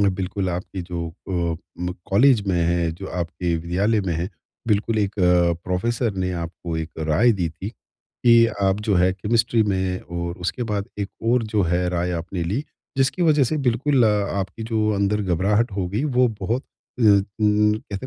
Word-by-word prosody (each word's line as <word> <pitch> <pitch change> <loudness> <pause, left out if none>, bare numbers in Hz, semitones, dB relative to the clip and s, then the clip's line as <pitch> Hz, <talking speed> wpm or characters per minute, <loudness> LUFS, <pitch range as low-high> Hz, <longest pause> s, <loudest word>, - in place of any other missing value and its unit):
बिल्कुल 95 -1 0
आपकी 90 +2 -5
जो 85 -1 -4 0.2
अ, 85 -3 -1 0.2
म 90 0 -2 0.2
कॉलेज 120 +4 +5
में 95 -2 +1
हैं, 85 -1 0
जो 95 +3 -8
आपके 85 0 -2
विद्यालय 95 +7 +1
में 95 -3 -2
हैं, 85 +3 -2 0.4
बिल्कुल 110 +1 +1
एक 100 -1 0 0.5
प्रोफ़ेसर 110 +5 0
ने 90 -1 -1
आपको 85 -1 -5
एक 80 0 -4
राय 80 +10 +3
दी 90 -5 -1
थी। 95 +5 -7 0.6
कि 115 -1 +7 0.2
आप 95 +2 +2
जो 105 - +3
हैं 90 +1 +3
केमिस्ट्री 115 +3 +1
में 95 -2 -1
और 85 +1 -5
उसके 90 +7 -2
बाद 100 -1 -1
एक 100 - -2 0.2
और 125 -1 +3
जो 105 -2 +3
है 90 +1 +1
राय 90 0 -1
आपने 85 +1 -4
ली 105 - -2 0.3
जिसकी 135 +7 +1
वज़ह 155 -4 +4
से 155 - 0
बिल्कुल 125 +1 +3
आपकी 100 0 0
जो 110 -1 +1
अंदर 100 +1 +1
घबराहट 100 +6 +1
होगी 100 +7 -2
वो 125 0 +6
बहुत 115 +8 -1
अ 125 - -10
अ, 100 -2 +6 0.2
कहते 105 +1 +1
100 Hz, 175 wpm, -23 LUFS, 90-110 Hz, 0.6 s, कि